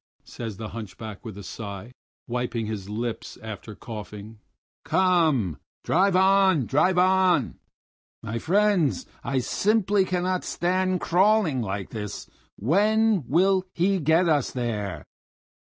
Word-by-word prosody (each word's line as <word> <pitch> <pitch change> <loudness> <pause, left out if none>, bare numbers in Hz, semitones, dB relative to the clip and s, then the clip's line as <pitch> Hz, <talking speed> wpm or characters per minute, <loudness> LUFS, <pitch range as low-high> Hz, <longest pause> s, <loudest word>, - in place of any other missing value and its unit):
says 110 -5 -7
the 110 -1 -6
hunchback 105 0 -8
with 110 -5 -8
a 100 - -8
sigh, 100 +3 -7 0.4
wiping 120 -2 -2
his 105 -2 -5
lips 115 +2 -4
after 110 -1 -8
coughing. 105 -1 -9 0.4
"Come, 160 - +2 0.2
drive 190 +2 +2
on! 190 -6 +4
drive 175 - +2
on! 185 -5 +3 0.6
My 115 +2 -3
friends, 190 - +2 0.2
I 135 - -1
simply 200 - +2
cannot 185 0 -1
stand 185 +1 0
crawling 185 - +3
like 100 -2 -4
this! 105 -2 -6 0.3
When 210 - +2
will 185 +4 +3
he 190 +2 +2
get 160 +3 +3
us 150 -5 +2
there?" 105 - -3
150 Hz, 120 wpm, -25 LUFS, -, 0.6 s, on